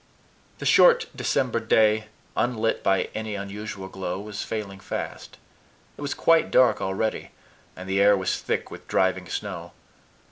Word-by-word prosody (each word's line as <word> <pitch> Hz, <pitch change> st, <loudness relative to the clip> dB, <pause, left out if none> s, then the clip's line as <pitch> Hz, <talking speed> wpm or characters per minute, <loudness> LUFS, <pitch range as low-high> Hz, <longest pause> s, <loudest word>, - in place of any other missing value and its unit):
The -, -, -7 dB
short 485 Hz, -2 st, +6 dB
December 125 Hz, -3 st, 0 dB
day, 110 Hz, -1 st, +3 dB, 0.3 s
unlit 115 Hz, -2 st, 0 dB
by 95 Hz, -1 st, +1 dB
any 110 Hz, -1 st, -4 dB
sunset 100 Hz, 0 st, -6 dB
glow, 95 Hz, -1 st, -4 dB
was 105 Hz, 0 st, -6 dB
failing 100 Hz, -3 st, -5 dB
fast. 95 Hz, -, -6 dB, 0.6 s
It -, -, -12 dB
was 145 Hz, 0 st, -3 dB
quite 165 Hz, -1 st, +3 dB
dark 130 Hz, -, +4 dB
already, 95 Hz, +3 st, -2 dB, 0.5 s
and 90 Hz, -, -9 dB
the 95 Hz, +1 st, +1 dB
air 100 Hz, 0 st, +6 dB
was 95 Hz, -, -1 dB
thick -, -, -2 dB
with -, -, -11 dB
driving 95 Hz, -1 st, +1 dB
snow. -, -, -5 dB
105 Hz, 145 wpm, -25 LUFS, 95-115 Hz, 0.6 s, short